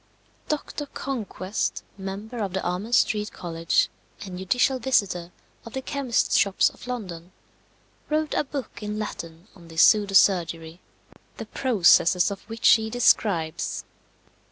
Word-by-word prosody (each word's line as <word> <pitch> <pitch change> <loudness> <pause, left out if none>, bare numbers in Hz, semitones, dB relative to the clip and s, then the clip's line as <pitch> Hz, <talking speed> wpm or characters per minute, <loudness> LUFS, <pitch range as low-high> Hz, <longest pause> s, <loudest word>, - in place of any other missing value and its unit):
Doctor 295 -1 -3
Conquest, 220 -8 -4
member 200 +5 -6
of 200 -4 -2
the 190 - -2
Amen 180 +6 -3
Street 210 -3 +2
College, 165 -1 0 0.4
and 185 -2 -7
judicial 250 +8 +1
visitor 190 -9 0 0.3
of 230 - -11
the 265 - -3
chemists' 270 -5 0
shops 200 -2 +3
of - - -14
London, 185 -8 -6 0.8
wrote 305 0 0
a - - +1
book 275 -5 -7
in 210 0 -4
Latin 170 -4 -6
on 170 -3 -15
this 165 +1 +3
pseudo 205 -2 +4
surgery, 170 -3 +2 0.6
the - - -6
processes 185 -6 +3
of 195 - -6
which 225 0 0
he 220 -1 +4
describes. 175 -8 +1
200 Hz, 130 wpm, -25 LUFS, 175-240 Hz, 0.8 s, pseudo